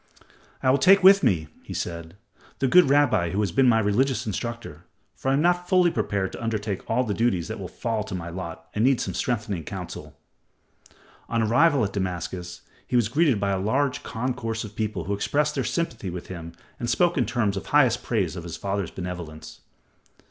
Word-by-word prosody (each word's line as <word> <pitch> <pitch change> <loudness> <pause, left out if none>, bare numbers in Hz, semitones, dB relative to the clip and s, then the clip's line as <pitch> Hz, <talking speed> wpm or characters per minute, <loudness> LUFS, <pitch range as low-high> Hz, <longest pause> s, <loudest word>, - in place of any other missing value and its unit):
"I 130 - +4
will 140 - +3
take 195 0 +6
with 195 +1 +8
me," 80 - +1
he - - -8
said, 85 0 -5 0.4
"the 135 - +1
good 180 +1 +6
rabbi 125 -11 +3
who 95 +4 -2
has 100 -4 0
been 130 +8 +4
my 110 - +4
religious 110 +4 +1
instructor, 110 -6 -5 0.3
for 135 - -3
I - - +3
am 145 - +1
not 175 0 +1
fully 180 -2 +4
prepared 95 -9 -1
to - - -8
undertake 110 -3 -3
all 125 +3 +2
the 110 -4 -2
duties 95 -6 0
that - - -5
will - - -5
fall 115 -2 -3
to 95 - -5
my 85 -1 -5
lot 85 -2 -7
and 105 - 0
need 130 0 +4
some - - -3
strengthening 105 -8 -2
counsel." - - -8 1.1
On 115 -1 +1
arrival 130 +4 +4
at 100 - -5
Damascus 90 -2 -4 0.3
he 125 - -2
was 120 -3 +3
greeted 140 -4 +2
by 100 0 0
a 95 - 0
large 135 +7 0
concourse 115 -1 -3
of 105 -1 -9
people 110 -5 -2
who 100 +5 -2
expressed 150 +9 0
their 135 - -1
sympathy 125 - -2
with 90 0 -7
him 85 -2 -7 0.3
and 120 - -3
spoke 175 +7 +2
in 125 - +1
terms 105 -5 0
of 95 - -5
highest 130 -5 +3
praise 95 -8 -1
of 85 - -5
his 85 -1 -6
father's 100 -2 -2
benevolence. 90 -4 -7
110 Hz, 200 wpm, -25 LUFS, 95-130 Hz, 1.1 s, with